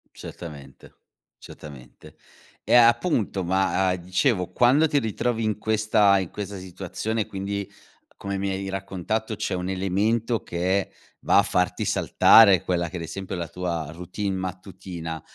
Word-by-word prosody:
Certamente. 70 -6 -11 0.4
Certamente. 70 -5 -13 0.5
Eh - - +2
appunto 120 - +3
ma, 95 +1 +1
a 90 - +1
dicevo, 90 +2 0
quando 135 +6 +4
ti 145 -1 +2
ritrovi 115 0 -2
in 110 -1 -1
questa 110 -2 +3
in 95 -3 -4
questa 100 -1 -6
situazione 105 +4 -4
quindi, 100 0 -5 0.5
come 100 0 -4
mi 100 0 -2
hai 95 0 -4
raccontato, 95 +3 -3
c'è 105 -2 -3
un 90 0 -4
elemento 105 +5 0
che 95 +3 -1 0.3
va - - +4
a - - +4
farti - - 0
saltare 100 -6 +5
quella 85 -2 -1
che 90 - -6
ad - - -6
esempio 95 +3 -6
è - - -5
la 85 - -4
tua 85 -4 -4
routine 95 +3 -4
mattutina, 90 -3 -6
95 Hz, 145 wpm, -24 LUFS, 90-110 Hz, 0.5 s, saltare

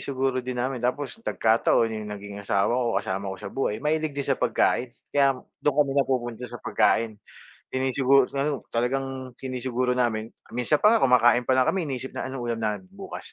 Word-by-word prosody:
siguro 130 -1 -1
din 125 0 -5
namin. 125 0 -2
Tapos 140 - -2
nagkataon 115 - +2
yung 110 -1 -5
naging 100 0 -8
asawa 100 +2 +1
ko 120 -2 +1
kasama 95 +1 -3
ko - - -7
sa - - -6
buhay 110 -5 -1
mahilig 155 0 +1
din 140 - -1
sa - - +2
pagkain, 125 - +2 0.2
kaya 140 -2 +4 0.2
dun 145 -2 +1
kami 145 -2 +3
napupunta 125 -3 0
sa 120 - -7
pagkain. 110 -2 +1 0.6
Sinisiguro 130 0 +3
ano 140 0 -1
talagang 130 +1 -2
sinisiguro 130 -1 -1
namin 115 -3 0 0.2
minsan 125 +5 +2
pa 210 - +6
nga 225 - +3
kumakain 120 -2 +5
palang 130 -1 +4
kami 190 -3 -1
iniisip 130 -1 -4
na, - - -4
anong 130 -2 -5
ulam 115 -1 -2
namin 105 -3 -1
bukas? - - -8
125 Hz, 180 wpm, -26 LUFS, 115-135 Hz, 0.6 s, pa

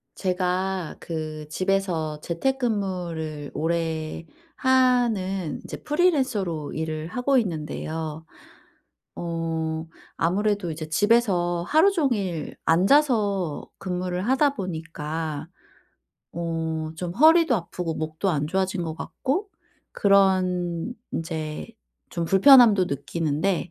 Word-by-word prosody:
제가 185 -1 -1
그 155 -2 -5
집에서 175 -4 -1
재택근무를 175 - -2
오래 160 0 -2 0.3
하는 235 - +2
이제 - - -7
프리랜서로 260 - 0
일을 155 0 -3
하고 250 +8 +1
있는데요. 160 -4 -3 0.9
어 165 -1 -3 0.3
아무래도 200 +2 0
이제 155 0 -6
집에서 175 -2 +2
하루 320 +7 +5
종일 210 - -1
앉아서 200 - +2
근무를 180 +1 -3
하다 270 +2 +3
보니까 160 - -4 0.9
어 165 -1 -2 0.2
좀 175 0 -4
허리도 320 - +6
아프고 175 -3 -3
목도 155 +5 -2
안 150 -3 0
좋아진 190 +2 -1
것 160 -2 -4
같고 310 - -3 0.4
그런 185 -1 +2 0.2
인제 160 0 -4 0.4
좀 170 -2 -2
불편함도 205 +1 +7
느끼는데 160 +5 -1
180 Hz, 215 characters per minute, -25 LUFS, 160-205 Hz, 0.9 s, 불편함도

